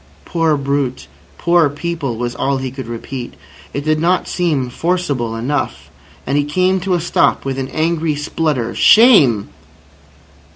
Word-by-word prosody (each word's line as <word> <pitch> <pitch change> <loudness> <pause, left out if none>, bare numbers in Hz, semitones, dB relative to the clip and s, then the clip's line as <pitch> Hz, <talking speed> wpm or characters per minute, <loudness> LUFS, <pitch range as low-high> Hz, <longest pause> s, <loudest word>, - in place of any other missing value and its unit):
"Poor 165 -3 +1
brute, 140 - -2 0.3
poor 170 -3 +3
people!" 145 -4 -4
was 120 0 -3
all 135 +1 -1
he 130 -1 -4
could 130 -2 -7
repeat. 120 +2 -6 0.4
It 140 +1 -4
did 155 0 +1
not 180 +3 +1
seem 155 -8 0
forcible 145 -8 -1
enough, 130 +5 -3 0.3
and 140 +3 +1
he - - +2
came 185 +6 +1
to 185 0 0
a - - 0
stop 170 - +1
with 135 0 -2
an 135 - -3
angry 160 +1 -1
splutter: 145 -4 -2
"Shame!" 150 - +5
145 Hz, 150 wpm, -17 LUFS, 130-170 Hz, 0.4 s, Shame